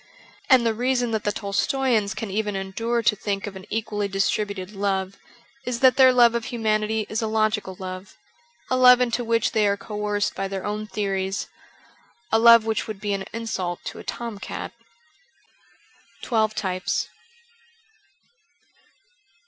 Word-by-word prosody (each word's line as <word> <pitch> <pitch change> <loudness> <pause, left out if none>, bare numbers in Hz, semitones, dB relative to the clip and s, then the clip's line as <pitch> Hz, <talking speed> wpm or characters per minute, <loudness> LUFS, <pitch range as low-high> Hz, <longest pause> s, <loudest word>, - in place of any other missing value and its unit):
And 255 -4 +6
the 225 - +2
reason 245 +1 0
that 220 -1 -2
the 205 - +2
Tolstoians 215 +1 0
can 220 -3 -5
even 210 0 -1
endure 225 +5 -2
to 210 - +3
think 200 -1 -3
of 205 -2 -7
an 190 0 -10
equally 210 -2 -2
distributed 195 0 -1
love 195 -1 -2 0.5
is 250 -2 -3
that 260 -1 +6
their 260 -1 +7
love 240 -2 +5
of 235 -1 -2
humanity 220 -2 0
is 215 - -2
a 220 - -1
logical 215 -3 0
love, 185 +1 -8 0.5
a - - +3
love 250 -1 +7
into 245 -1 0
which 230 -1 +1
they 215 -2 +2
are 200 0 +1
coerced 210 -1 -2
by 195 +1 -3
their 190 -1 -5
own 210 +1 -3
theories, 195 -2 -2 0.8
a 225 - +4
love 230 -1 +7
which 220 -1 -1
would 215 -3 -6
be 205 0 -2
an 195 -1 -3
insult 195 -6 -4
to - - -6
a - - -9
tom 230 -4 -5
cat. - - -6 0.8
' - - -32
Twelve 220 -3 +1
Types.' 185 -3 -2
215 Hz, 155 wpm, -24 LUFS, 200-230 Hz, 0.8 s, their